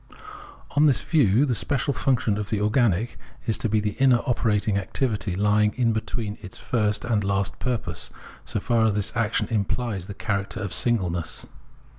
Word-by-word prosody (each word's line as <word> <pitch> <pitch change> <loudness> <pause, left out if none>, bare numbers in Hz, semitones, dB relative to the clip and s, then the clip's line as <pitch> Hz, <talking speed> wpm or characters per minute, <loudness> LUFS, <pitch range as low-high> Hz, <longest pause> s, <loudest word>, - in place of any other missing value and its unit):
On 150 +2 +4
this 135 - +3
view 140 - +3
the 130 - 0
special 140 +3 0
function 115 -6 +1
of 105 - -4
the 105 - 0
organic 105 0 +1 0.3
is 115 -3 +1
to 115 - -1
be 110 +1 +2
the 105 0 -1
inner 130 -3 +4
operating 110 -4 +1
activity 105 -2 -2
lying 105 +2 +2
in 120 -3 +2
between 110 -1 -3
its 90 - -9
first 105 -3 0
and 110 -4 +1
last 100 -1 -1
purpose, 115 -9 -3 0.3
so - - -2
far 115 +2 +2
as 105 - +1
this 105 +2 -2
action 115 -2 +1
imphes 105 -2 -1
the 100 - -7
character 100 -2 -2
of 100 -2 -4
singleness. 90 -9 0
105 Hz, 170 wpm, -25 LUFS, 100-120 Hz, 0.3 s, On